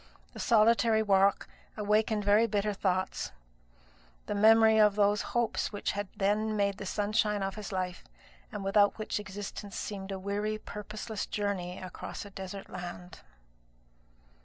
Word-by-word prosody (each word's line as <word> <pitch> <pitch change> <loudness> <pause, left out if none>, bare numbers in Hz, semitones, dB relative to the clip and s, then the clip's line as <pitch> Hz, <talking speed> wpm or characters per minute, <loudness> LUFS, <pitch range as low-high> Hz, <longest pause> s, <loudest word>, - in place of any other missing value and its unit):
The - - -9
solitary 225 0 +4
walk 195 -1 +3 0.3
awakened 210 0 +1
very 210 +3 +5
bitter 210 -1 0
thoughts; 185 -1 -1 0.9
the - - -3
memory 220 +1 +6
of 210 -1 +5
those 205 0 +3 0.2
hopes 235 -1 0
which 205 - -2
had 205 0 -3
then 210 +2 +1
made 200 -1 0
the 195 - -5
sunshine 210 0 0
of 195 0 -2
his 210 0 -7
life, 185 -2 -3 0.5
and 200 - -5
without 205 +1 +3
which 215 -1 -2
existence 205 0 -7
seemed 195 -1 -5
a 195 - -3
weary 205 +3 -2
purposeless 215 0 -6
journey 195 -4 -2
across 185 +2 -7
a 200 - -11
desert 195 0 -7
land. 180 -1 -8
205 Hz, 140 wpm, -30 LUFS, 195-215 Hz, 0.9 s, memory